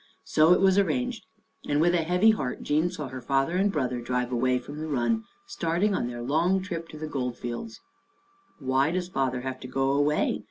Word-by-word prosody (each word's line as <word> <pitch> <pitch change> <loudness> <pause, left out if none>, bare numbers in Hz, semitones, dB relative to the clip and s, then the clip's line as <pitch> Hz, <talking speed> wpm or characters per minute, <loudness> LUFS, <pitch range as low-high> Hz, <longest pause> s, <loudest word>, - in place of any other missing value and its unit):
So 155 +2 +4
it 180 - +6
was 195 0 +5
arranged, 250 +2 -1 0.4
and 145 - +2
with 175 +2 +4
a 175 - +3
heavy 180 +7 +4
heart 135 -12 -3
Jean 155 +4 +1
saw 155 -7 -6
her 130 0 -7
father 135 +6 0
and 195 +2 +2
brother 125 -7 -1
drive 125 +1 -2
away 125 +1 +2
from 145 +4 -8
the 155 - -4
run, 155 - 0 0.2
starting 200 - 0
on 120 - -1
their 120 -1 -6
long 165 +8 +2
trip 170 -4 -5
to 155 - -9
the 155 - -5
Gold 125 -5 -3
Fields. 120 - -6 0.8
"Why 135 +1 +1
does 180 +1 -2
father 130 -5 -1
have 130 0 -5
to 125 - -8
go 135 +1 0
away?" 145 +2 +1
150 Hz, 205 wpm, -27 LUFS, 130-180 Hz, 0.8 s, it